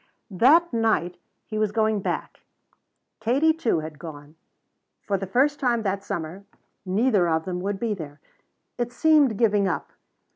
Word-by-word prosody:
That 285 Hz, -, +4 dB
night 215 Hz, -7 st, +1 dB, 0.3 s
he 215 Hz, -, -4 dB
was 215 Hz, -2 st, +1 dB
going 215 Hz, -1 st, +1 dB
back. -, -, -4 dB, 0.8 s
Katie, 270 Hz, +8 st, +2 dB
too, 240 Hz, -, 0 dB
had 155 Hz, -1 st, -9 dB
gone. 150 Hz, -2 st, -10 dB, 0.7 s
For 200 Hz, -, -1 dB
the 195 Hz, 0 st, -3 dB
first 280 Hz, +8 st, +2 dB
time 240 Hz, -4 st, +1 dB
that 195 Hz, -1 st, -2 dB
summer 180 Hz, -1 st, -5 dB, 0.4 s
neither 200 Hz, -2 st, +2 dB
of 160 Hz, 0 st, 0 dB
them 180 Hz, -1 st, -3 dB
would 195 Hz, +1 st, -3 dB
be 230 Hz, -2 st, -1 dB
there. 150 Hz, -6 st, -8 dB, 0.6 s
It 240 Hz, 0 st, -1 dB
seemed 290 Hz, -6 st, +3 dB
giving 205 Hz, -3 st, +2 dB
up. 175 Hz, -, -3 dB
205 Hz, 150 wpm, -24 LUFS, 180-240 Hz, 0.8 s, That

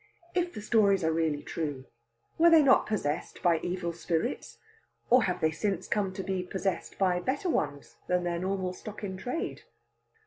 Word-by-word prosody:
If 355 Hz, -1 st, 0 dB
the 210 Hz, -, -7 dB
stories 200 Hz, -4 st, +3 dB
are 160 Hz, 0 st, +2 dB
really 160 Hz, -3 st, 0 dB
true, 145 Hz, -5 st, -4 dB, 0.5 s
were 340 Hz, +1 st, +7 dB
they 325 Hz, -2 st, +7 dB
not 270 Hz, -1 st, +5 dB
possessed 155 Hz, -9 st, -2 dB
by 170 Hz, -2 st, +4 dB
evil 175 Hz, -1 st, -3 dB
spirits? 170 Hz, +6 st, -2 dB, 0.5 s
Or 250 Hz, -1 st, +6 dB
have 180 Hz, -, -2 dB
they 160 Hz, -, +3 dB
since 190 Hz, +2 st, -2 dB
come 205 Hz, -3 st, 0 dB
to 190 Hz, 0 st, -5 dB
be 190 Hz, -1 st, -1 dB
possessed 190 Hz, +1 st, -3 dB
by 180 Hz, -2 st, +2 dB
better 275 Hz, -, -1 dB
ones 145 Hz, -, -2 dB
than 180 Hz, 0 st, +1 dB
their 170 Hz, -1 st, -1 dB
normal 185 Hz, 0 st, -2 dB
stock 215 Hz, +3 st, -9 dB
in 190 Hz, -2 st, -3 dB
trade? 250 Hz, -, -4 dB
185 Hz, 175 wpm, -29 LUFS, 170-215 Hz, 0.5 s, were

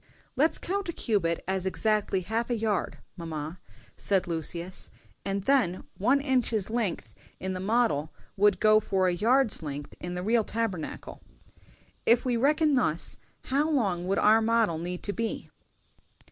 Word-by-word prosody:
"Let's 310 Hz, +4 st, +2 dB
count 390 Hz, 0 st, -3 dB
a -, -, -2 dB
cubit 180 Hz, -, 0 dB
as 190 Hz, -1 st, -1 dB
exactly 200 Hz, +1 st, 0 dB
half 225 Hz, +6 st, -2 dB
a 240 Hz, -, 0 dB
yard, 215 Hz, -4 st, -1 dB, 0.2 s
mamma," 160 Hz, 0 st, -6 dB, 0.4 s
said 195 Hz, -2 st, +1 dB
Lucius, 170 Hz, +2 st, -4 dB, 0.3 s
"and 195 Hz, 0 st, -2 dB
then 220 Hz, -9 st, +2 dB
one 250 Hz, +8 st, +3 dB
inch's 240 Hz, -7 st, 0 dB
length 225 Hz, -7 st, -2 dB, 0.3 s
in 190 Hz, 0 st, -3 dB
the 185 Hz, -, -4 dB
model 185 Hz, -8 st, +1 dB, 0.2 s
would 205 Hz, -1 st, +3 dB
go 215 Hz, 0 st, +6 dB
for 195 Hz, -3 st, +1 dB
a 180 Hz, -, +2 dB
yard's 230 Hz, +5 st, +3 dB
length 145 Hz, -2 st, -6 dB
in 175 Hz, 0 st, -5 dB
the 180 Hz, -, -3 dB
real 225 Hz, +2 st, +2 dB
Tabernacle. 215 Hz, -7 st, -4 dB, 0.8 s
If 235 Hz, +2 st, +3 dB
we 250 Hz, -2 st, +1 dB
reckon 300 Hz, +5 st, +3 dB
thus, 175 Hz, -, +1 dB, 0.3 s
how 285 Hz, +4 st, +1 dB
long 195 Hz, -, 0 dB
would 195 Hz, -, +1 dB
our 220 Hz, +2 st, +5 dB
model 225 Hz, -7 st, +2 dB
need 180 Hz, +1 st, -5 dB
to 205 Hz, -, -2 dB
be?" 230 Hz, +1 st, -4 dB
205 Hz, 155 wpm, -28 LUFS, 180-235 Hz, 0.8 s, go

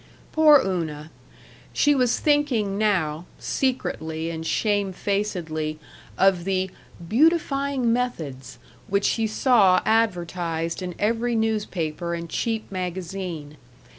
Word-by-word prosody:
Poor 305 Hz, -2 st, +7 dB
Una! 160 Hz, -5 st, -3 dB, 0.6 s
She 290 Hz, -, +4 dB
was 250 Hz, -3 st, +2 dB
thinking 270 Hz, -10 st, +1 dB
now, 180 Hz, -7 st, 0 dB
secretly 165 Hz, -11 st, -2 dB
and 160 Hz, -1 st, -5 dB
shamefacedly, 190 Hz, -5 st, -1 dB, 0.4 s
of 190 Hz, -2 st, +3 dB
the 190 Hz, 0 st, -1 dB, 0.4 s
"beautifying 275 Hz, -, +2 dB
methods" 160 Hz, -, -3 dB, 0.3 s
which 200 Hz, +1 st, +1 dB
she 225 Hz, -1 st, +1 dB
saw 215 Hz, -5 st, +4 dB
advertised 175 Hz, -6 st, 0 dB
in 180 Hz, -2 st, -5 dB
every 230 Hz, +3 st, 0 dB
newspaper 185 Hz, -7 st, -1 dB
and 170 Hz, -1 st, -7 dB
cheap 225 Hz, -3 st, -2 dB
magazine. 180 Hz, -4 st, -5 dB
195 Hz, 100 wpm, -24 LUFS, 170-230 Hz, 0.6 s, Poor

